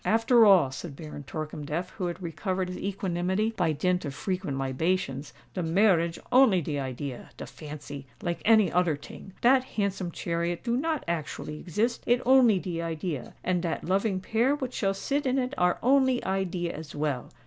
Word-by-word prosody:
"After 225 0 +5
all," 175 -10 +6
said 140 +2 -7
Baron 150 -2 -8
Torkemdef, 155 +3 -4
who 180 - -3
had 175 +1 -5
recovered 185 +3 -2
his 180 - -5
equanimity, 190 +2 -1
by 170 -5 +1
dint 180 +4 0
of 140 -3 -5
frequent 180 -6 -3
libations, 135 +1 -1 0.2
"de 185 - -2
marriage 170 -1 +3
only 250 -7 +6
de 150 -3 -3
idea—de 130 -1 -6
fancy, 145 -2 -9
like 170 -1 -3
any 220 -2 +5
oder 175 -3 +3
ting. 160 +6 -11
Dat 255 +2 +5
handsome 200 -6 -2
chariot 170 0 -2
do 235 0 0
not 310 +2 -1
actually 155 -2 -4
exist—it 235 +6 0
only 250 -5 +6
de 175 -2 -3
idea; 165 -3 -4
and 180 -1 +1
dat 170 -2 -2
loving 190 +1 +1
pair 230 +8 +1
what 260 -4 -5
shall 195 -2 0
sit 280 +7 -1
in 260 +1 +1
it 255 0 -1
are 180 0 +2
only 260 0 +3
idea 185 -3 -1
as 155 -1 -8
well. 145 -4 -2
180 Hz, 170 wpm, -28 LUFS, 155-215 Hz, 0.2 s, all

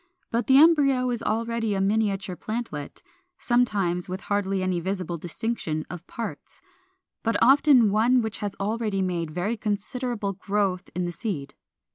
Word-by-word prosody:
But 235 +1 0
the 265 - +6
embryo 275 -5 +5
is 235 -1 -2
already 230 -1 -1
a - - 0
miniature 195 -2 0
plantlet, 215 -10 -5 0.3
sometimes 200 -8 +1
with 185 +1 -4
hardly 195 -2 -1
any 185 -2 0
visible 180 -2 -3
distinction 170 -3 -3
of 175 0 -8
parts, 230 - -7 0.6
but 230 0 +1
often 265 -4 +6
one 235 +4 +3
which 220 -1 -3
has 205 -2 -3
already 210 -1 -1
made 175 -3 -2
very 180 +8 -2
considerable 215 0 -2
growth 195 -1 -1
in 180 0 -1
the 175 - -2
seed. 165 -7 -4
205 Hz, 145 wpm, -25 LUFS, 185-235 Hz, 0.6 s, the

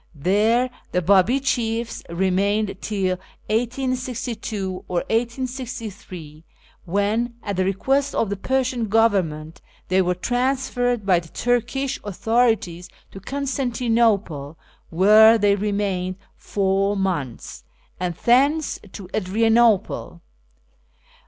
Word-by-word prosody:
There 215 - +2 0.2
the 180 - +2
Babi 200 +8 +4
chiefs 235 -3 -1
remained 195 +4 0
till 190 -3 -1 0.3
1862 235 -5 -2
or 175 -1 -1
1863, 230 - -4 0.4
when, 210 +6 0
at 200 -2 -3
the 185 - +1
request 265 +9 0
of 210 - 0
the - - 0
Persian 255 +1 -1
Government, 185 -8 +1 0.3
they 185 +1 +3
were 180 0 0
transferred 245 +1 -1
by 185 -3 +4
the 170 - -12
Turkish 245 - -1
authorities 210 -4 0 0.2
to 195 - -9
Constantinople 230 - 0 0.3
(where 215 +6 +6
they 205 -2 +3
remained 200 -2 -1 0.2
four 195 0 0
months), 170 -11 -3 0.4
and 180 -1 -2
thence 280 - +2
to 195 - -8
Adrianople. 220 -3 +1
210 Hz, 100 wpm, -22 LUFS, 185-245 Hz, 0.4 s, where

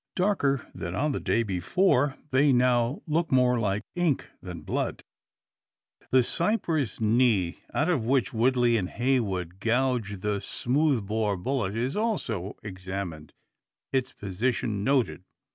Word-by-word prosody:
Darker 180 - +1
than 85 +2 -5
on 150 +2 +1
the - - -2
day 115 - +1
before, 130 - +1
they 140 +2 +4
now 125 +1 +2
look 165 +2 0
more 125 -2 +4
like 105 -1 0
ink 175 -6 0
than 90 -3 -7
blood! - - -2 1.1
The 130 -1 +5
cypress 165 - 0
knee, 110 -5 +2
out 150 - +1
of 165 -10 +1
which 125 -2 +1
Woodley 120 0 +3
and 95 -4 -2
Heywood 100 -9 -1
"gouged" 115 -4 0
the 105 -1 0
smooth 130 +2 0
bore 105 -1 0
bullet, 105 -1 -2
is 125 +4 -1
also 125 - -2
examined, 95 -5 -6 0.6
its 130 -2 0
position 105 +1 -2
noted. 130 -6 +1
120 Hz, 130 wpm, -27 LUFS, 100-135 Hz, 1.1 s, The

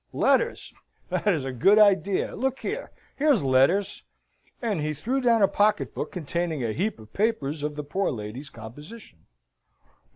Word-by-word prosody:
Letters! 480 0 +1 0.4
that - - -2
is 160 -9 +2
a 135 - -3
good 195 - +4
idea! 200 -2 +3
Look 265 +1 -2
here! 470 +4 -4 0.3
Here's 285 - +3
letters!" 135 +10 +2 0.6
And 210 -9 -1
he 150 0 -2
threw 250 - -1
down 230 -4 +4
a - - +7
pocket 210 +2 +1
book - - -4
containing 170 -4 -3
a 110 -2 -1
heap 200 - -1
of 110 0 -15
papers 160 -9 -1
of 150 0 -3
the 150 - -4
poor 190 +7 -1
lady's 120 +5 -6
composition. 120 - -12
175 Hz, 160 wpm, -26 LUFS, 140-215 Hz, 0.6 s, a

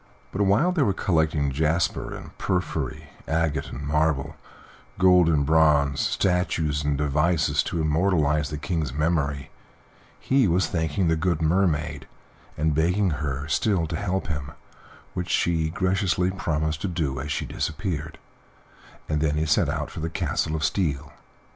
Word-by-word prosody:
But 95 - -2
while 100 - +3
they 180 -4 0
were 105 -8 +3
collecting 80 -5 +1
jasper 80 +4 0
and - - -11
porphyry, 80 -7 -2 0.2
agate 80 -1 0
and 70 +3 -7
marble, 75 -2 0 0.6
gold 90 -2 +5
and 75 -3 +2
bronze, 75 -2 +3
statues 80 -5 0
and 75 -1 0
devices, 75 +4 +1
to 85 - -2
immortalize 75 -2 +1
the 75 - -4
King's 75 -2 -2
memory, 75 -3 -1 0.7
he 130 -4 +2
was 90 +2 +2
thanking 80 +2 -1
the 80 - +3
good 85 0 0
Mermaid 80 -2 0 0.5
and 75 0 +1
begging 90 +5 +2
her 70 -2 -3
still 95 +1 +1
to 80 +1 -4
help 95 +2 -2
him, 75 -4 -4 0.6
which 90 0 -4
she 80 -2 +1
graciously 90 0 +1
promised 80 -4 -2
to 100 - -1
do 80 -7 -2
as 75 +2 -4
she 70 - -2
disappeared; 80 -2 -4 0.9
and 75 -1 -1
then 75 -1 +1
he 75 +1 0
set 75 - +2
out - - -3
for - - -7
the 80 +1 -2
Castle 80 0 -1
of 80 - -3
Steel. 75 -7 -1
80 Hz, 150 wpm, -25 LUFS, 75-90 Hz, 0.9 s, gold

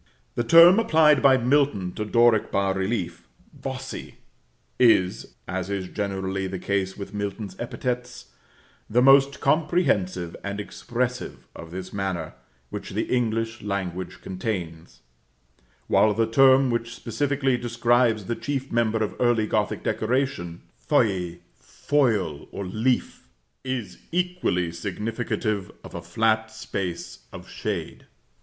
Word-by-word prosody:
The 120 - -1
term 170 - +8
applied 160 - +4
by 135 -1 +6
Milton 125 -7 +1
to 105 - -4
Doric 115 0 +3
bas 95 -1 +1
relief 95 -4 -3 0.3
"bossy," - - -7 0.6
is, 95 - +3
as 95 +1 -3
is 95 -2 -3
generally 95 -1 -2
the 95 0 -4
case 95 0 -2
with 100 0 -7
Milton's 100 -1 -4
epithets, 125 +1 -4 0.6
the 125 +3 +3
most 135 +1 +6
comprehensive 140 - +1
and 100 +1 -4
expressive 120 +4 -4
of 85 - -9
this 95 +2 -7
manner, 95 -5 -3 0.4
which - - -6
the - - -2
English 115 -2 -1
language 95 -3 -4
contains; 85 - -5 0.8
while 105 -1 +3
the 115 - +2
term 130 +2 +5
which 120 0 -2
specifically 135 +3 0
describes 120 -2 +2
the 115 - -2
chief 135 0 -4
member 110 -1 +1
of 105 - -3
early 120 -3 +3
Gothic - - -1
decoration, 110 -8 -1 0.2
feuille, 90 - +1 0.2
foil 110 - 0
or 100 - -5
leaf, 115 +7 -1 0.4
is 125 -8 -4
equally 175 - 0
significative 105 +3 -3
of - - -11
a - - -5
flat 110 0 +1
space 95 -9 -5
of - - -10
shade. - - -5
110 Hz, 120 wpm, -25 LUFS, 95-125 Hz, 0.8 s, term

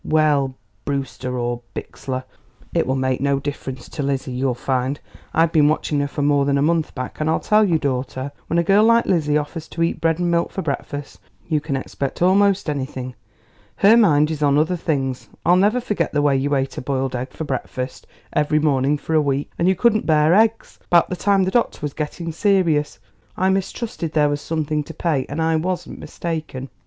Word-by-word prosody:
"Well, 145 -4 +2 0.3
Brewster 135 -2 -3
or 120 0 -2
Bixler; 130 -1 -5 0.5
it - - +1
will 130 - +1
make 130 -1 0
no 140 0 +1
difference 135 -3 -6
to 150 - -5
Lizzie, 135 -1 -2
you'll 125 0 -1
find. 130 +2 -1 0.3
I've 165 0 +3
been 150 -3 +4
watching 150 -1 0
her 145 - 0
for 145 0 -3
more 145 -1 +3
than 140 0 +2
a 140 - +2
month 160 0 0
back, 130 +3 -5
and 155 - +1
I'll 160 - +2
tell 215 0 +3
you, 175 -6 +3
daughter, 130 -1 -3 0.2
when 170 - 0
a 170 - +3
girl 200 +4 +4
like 230 +1 +4
Lizzie 150 -5 +2
offers 155 +2 -4
to 165 - -2
eat 165 - -1
bread 165 -1 +2
and 175 -1 0
milk 170 0 +1
for 190 - -4
breakfast 145 - -5 0.3
you 150 +3 +1
can 145 -2 -3
expect 135 0 -4
almost 195 +1 +3
anything. 130 -3 -4 0.6
Her 205 - +6
mind 155 -9 +4
is 155 -1 -4
on 145 -1 +3
other 160 +4 +2
things. 135 -6 -2 0.2
I'll 175 - +5
never 205 +6 +3
forget 215 -4 -2
the 145 -1 +2
way 145 -2 +3
you 140 +2 +1
ate 135 0 -2
a - - -5
boiled 135 -1 -2
egg 125 +2 -3
for - - -6
breakfast 130 -2 -5 0.3
every 150 0 +2
morning 145 -1 +2
for 160 - -5
a 155 - +5
week 140 -1 -1
and 170 - +2
you 190 - +4
couldn't 220 +1 +2
bear 155 0 +4
eggs 220 +3 +2
about 170 0 +4
the - - 0
time 195 +1 +2
the 185 - 0
doctor 240 +2 +1
was 145 -2 -4
getting 165 +2 -4
serious. 165 -5 +1 0.4
I 190 +1 +2
mistrusted 190 -3 -2
there 150 -2 +3
was 145 0 -2
something 155 -2 -1
to 165 - -10
pay, 155 -6 0
and 145 - -4
I 160 0 +2
wasn't 180 +3 -3
mistaken." 155 -6 -5
150 Hz, 210 wpm, -21 LUFS, 135-170 Hz, 0.6 s, Her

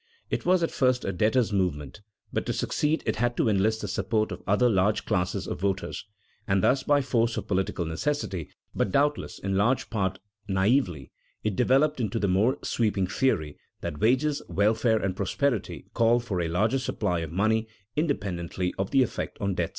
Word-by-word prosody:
It - - -2
was 180 -1 +4
at 165 - 0
first 130 -1 +1
a - - 0
debtors' 110 +4 +1
movement, 90 -3 -1 0.3
but - - -2
to - - 0
succeed 155 +2 0
it - - -1
had 120 +1 0
to - - +2
enlist 110 +1 +2
the - - -3
support 110 -1 0
of - - -6
other 105 +5 +4
large 105 -1 +2
classes 90 0 -1
of - - -4
voters. 95 +1 -2 0.4
And 95 -2 +2
thus, 130 +1 +3
by 145 0 +2
force 115 -3 +1
of - - -4
political 95 -3 -1
necessity, 90 - -2 0.2
but 95 - 0
doubtless 145 +4 +1
in 95 0 -2
large 120 +6 +1
part 95 -4 -1 0.3
naïvely, 95 - +1 0.3
it 105 -3 -1
developed 135 +5 +3
into 115 -2 -1
the 105 - +1
more 105 +9 +2
sweeping 105 -5 0
theory 90 - 0 0.2
that 75 - -5
wages, 135 - +2
welfare, 110 +3 +2
and 95 -3 -2
prosperity 110 +4 -1
called 115 +1 +3
for 95 -6 -1
a 85 - -1
larger 110 +10 +1
supply 90 -8 -1
of 80 -2 -5
money 110 +5 +1 0.3
independently 95 - -2
of 95 - -1
the 135 - +4
effect 125 - -4
on 100 -1 0
debts. 85 -2 -1
105 Hz, 180 wpm, -27 LUFS, 95-125 Hz, 0.4 s, was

